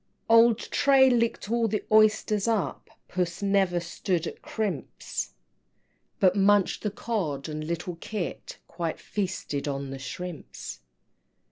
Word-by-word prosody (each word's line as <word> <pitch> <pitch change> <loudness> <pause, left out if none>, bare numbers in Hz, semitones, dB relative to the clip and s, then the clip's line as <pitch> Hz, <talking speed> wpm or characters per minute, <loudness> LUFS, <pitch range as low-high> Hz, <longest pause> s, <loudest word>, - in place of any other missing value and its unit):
XVI. - - -10
Old 230 -1 +7
Tray 270 +1 +4
licked 230 -3 0
all 235 -1 +2
the 215 0 -1
oysters 215 -1 +4
up, 220 -5 -1 0.2
Puss 175 +1 -2
never 195 -3 +2
stood 170 0 -2
at - - -7
crimps, 200 - -4 0.8
But 185 -1 +4
munched 200 -1 +3
the 210 - -1
Cod 195 - -3
and 155 0 -4
little 170 +2 -4
Kit 195 0 -5
Quite 170 -2 -4
feasted 185 -8 -3
on 140 -1 -3
the 135 - -6
shrimps! 145 - -7
190 Hz, 130 wpm, -27 LUFS, 170-215 Hz, 0.8 s, Old